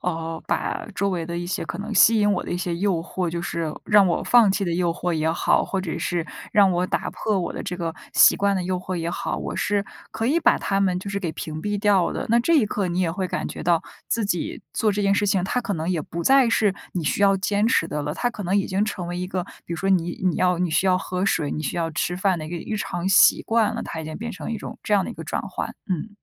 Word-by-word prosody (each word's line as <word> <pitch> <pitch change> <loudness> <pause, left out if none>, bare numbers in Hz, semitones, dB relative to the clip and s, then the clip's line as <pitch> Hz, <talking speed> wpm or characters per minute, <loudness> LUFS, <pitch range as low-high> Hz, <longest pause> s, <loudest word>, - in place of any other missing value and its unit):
呃， 165 -2 -3
把 - - -2
周 200 0 0
围 170 -3 -2
的 170 0 -4
一 175 - -3
些 180 - -2
可 - - -4
能 210 +2 -5
吸 220 +2 +6
引 205 0 +3
我 190 - -1
的 - - -8
一 175 - -1
些 175 -1 -2
诱 195 +2 +1
惑 180 0 -3
就 170 +1 -3
是 170 -2 -2
让 205 -2 +5
我 170 - 0
放 235 -4 +5
弃 200 +1 0
的 175 - -1
诱 175 0 +1
惑 175 0 -2
也 160 0 +1
好， - - +2
或 195 - -2
者 170 -4 -4
是 175 -2 -2 0.3
让 200 -2 +5
我 180 +1 0
打 - - -2
破 215 -2 -1
我 180 - -2
的 - - -5
这 180 - -4
个 165 -2 -3 0.2
习 - - +7
惯 200 -1 +1
的 185 - -1
诱 185 0 -1
惑 185 +1 -5
也 170 0 -2
好， - - -3
我 - - -4
是 205 -1 0 0.3
可 225 - -2
以 310 +7 +2
把 - - +4
它 195 0 0
们 185 -2 +1
就 195 +2 -6
是 200 0 -2
给 170 -5 -2
屏 155 0 -6
蔽 205 +3 -2
掉 200 -3 +3
的， - - -3
那 235 - +5
这 335 +8 +2
一 280 - +5
刻 200 -2 -2
你 175 +1 -2
也 175 -3 +1
会 185 +1 -2
感 - - -2
觉 - - -7
到 170 -1 +2 0.3
自 230 -2 0
己 185 +2 -2
做 220 - +1
这 205 0 -1
件 200 0 +3
事 205 0 +1
情， 195 -2 +2
它 250 +6 0
可 205 -5 -3
能 160 +1 -3
也 175 -3 0
不 170 +3 -5
再 270 -3 +5
是 210 -3 +2 0.2
你 175 -4 -3
需 200 - 0
要 195 -1 +5
坚 200 +2 +1
持 225 -8 +2
的 150 - -3
了。 150 +1 -3
它 245 - 0
可 210 - -7
能 190 +3 +1
已 200 - +1
经 190 +2 0
成 185 -5 -4
为 175 0 -4
一 180 - -3
个 180 -1 -3 0.2
比 - - -5
如 - - -5
说 195 +4 -2
你 175 -2 +2
你 180 - +2
要 180 -1 +2
你 180 -1 0
需 185 +4 +2
要 185 - +4
喝 185 0 -2
水、 150 -6 +1
你 155 - -3
需 140 - -3
要 165 -1 -1
吃 175 +3 -2
饭 190 -1 +1
的 155 - -6
一 - - -8
个 175 - -4
日 215 +6 -4
常 175 -3 -3
习 195 - +6
惯 225 -1 +1
了， 230 - -3
它 160 - -5
已 160 - -7
经 155 - -6
变 235 +2 -5
成 160 -1 -6
一 225 - -2
种 - - -8
这 210 - +1
样 195 -2 +3
的 - - -5
一 - - -7
个 - - -8
转 - - -3
换， - - -4 0.2
嗯。 185 +1 -2
185 Hz, 320 characters per minute, -23 LUFS, 170-205 Hz, 0.3 s, 习